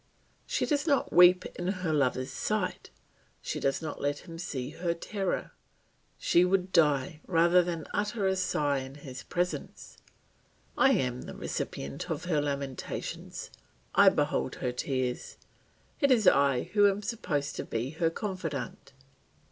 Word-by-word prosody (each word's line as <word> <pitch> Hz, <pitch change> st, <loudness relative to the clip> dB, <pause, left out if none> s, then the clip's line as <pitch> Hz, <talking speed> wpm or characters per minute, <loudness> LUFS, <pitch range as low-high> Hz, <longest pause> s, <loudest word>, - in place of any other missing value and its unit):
She -, -, 0 dB
does 295 Hz, +1 st, 0 dB
not 280 Hz, -3 st, +2 dB
weep 180 Hz, +1 st, +7 dB
in 175 Hz, -, -2 dB
her 185 Hz, -4 st, -1 dB
lover's 130 Hz, -3 st, +1 dB
sight, -, -, -2 dB, 0.5 s
she -, -, -4 dB
does 135 Hz, +4 st, 0 dB
not 155 Hz, -, -5 dB
let 145 Hz, 0 st, -2 dB
him 165 Hz, -1 st, -8 dB
see 135 Hz, -6 st, -4 dB
her 170 Hz, +1 st, -2 dB
terror; 195 Hz, +2 st, -3 dB, 0.7 s
she 175 Hz, -, +4 dB
would 185 Hz, 0 st, +1 dB
die 150 Hz, -2 st, +2 dB
rather 175 Hz, +1 st, +5 dB
than 170 Hz, -3 st, -3 dB
utter 210 Hz, 0 st, -1 dB
a 190 Hz, 0 st, +2 dB
sigh 150 Hz, -6 st, +1 dB
in 135 Hz, +1 st, -8 dB
his 135 Hz, -3 st, -8 dB
presence. 180 Hz, 0 st, -4 dB, 0.8 s
I 270 Hz, -, +5 dB
am 125 Hz, -, 0 dB
the -, -, -8 dB
recipient 70 Hz, -, -4 dB
of 160 Hz, +1 st, -3 dB
her 155 Hz, -5 st, +1 dB
lamentations, 140 Hz, -2 st, -4 dB, 0.4 s
I -, -, +8 dB
behold -, -, 0 dB
her 125 Hz, -, -2 dB
tears, 130 Hz, 0 st, -3 dB, 0.6 s
it 280 Hz, -, +3 dB
is 235 Hz, -5 st, +4 dB
I 140 Hz, -3 st, +4 dB
who 205 Hz, -1 st, +6 dB
am 200 Hz, +1 st, -3 dB
supposed 150 Hz, -10 st, -2 dB
to -, -, -2 dB
be 120 Hz, +4 st, -3 dB
her 160 Hz, +1 st, +1 dB
confidant. 165 Hz, -, -5 dB
165 Hz, 150 wpm, -29 LUFS, 140-185 Hz, 0.8 s, I